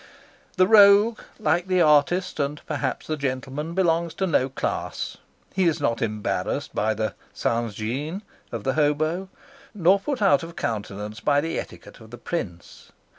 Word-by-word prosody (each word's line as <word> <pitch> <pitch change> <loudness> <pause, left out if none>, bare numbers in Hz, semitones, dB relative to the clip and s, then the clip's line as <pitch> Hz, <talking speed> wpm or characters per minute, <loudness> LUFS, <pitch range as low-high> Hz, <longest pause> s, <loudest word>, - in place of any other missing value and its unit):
The 185 - +5
rogue, 205 +2 +6 0.2
like 170 +4 +1
the 185 -1 +2
artist 165 +3 +3
and 145 +1 -1
perhaps 145 -4 -3
the 155 - -2
gentleman, 140 +3 -4
belongs 170 -3 +1
to 190 - 0
no 135 -7 +2
class. 130 - -3 0.4
He 190 -1 +2
is 165 -3 +2
not 115 -5 0
embarrassed 110 -2 -2
by 110 +1 0
the 110 0 -2 1.4
of 115 -3 -5
the 130 - 0
hobo, 155 +5 0 0.5
nor 190 +1 +4
put 270 +6 -3
out 195 -3 +4
of 165 0 -9
countenance 105 -1 -4
by 145 +5 +2
the 165 +2 -2
etiquette - - -10
of 110 -1 -14
the 120 - -9
prince. 100 - -6
155 Hz, 150 wpm, -24 LUFS, 130-180 Hz, 1.4 s, rogue